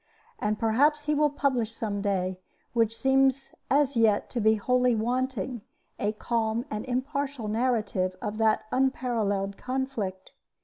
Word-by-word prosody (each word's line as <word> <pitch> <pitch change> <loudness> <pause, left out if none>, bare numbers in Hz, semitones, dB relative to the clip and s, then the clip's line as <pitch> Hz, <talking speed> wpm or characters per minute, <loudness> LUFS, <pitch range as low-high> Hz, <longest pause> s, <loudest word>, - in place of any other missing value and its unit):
And 210 0 0
perhaps 285 +8 +2
he 300 0 0
will 300 0 +3
publish 255 -6 -1
some 205 -3 -3
day 185 -2 -1 0.3
what 230 -2 +3
seems 270 +2 +2 0.2
as 280 -1 +3
yet 220 -3 +3
to 240 - -1
be 220 +1 +5
wholly 250 +3 +2
wanting 245 0 -1 0.4
a 205 - +1
calm 225 +1 -1
and 215 0 -3
impartial 270 -1 -2
narrative 210 -5 0
of 210 +1 -4
that 220 -1 +2
unparalleled 225 -7 0
conflict. 250 -8 -3
235 Hz, 135 wpm, -27 LUFS, 210-265 Hz, 0.4 s, be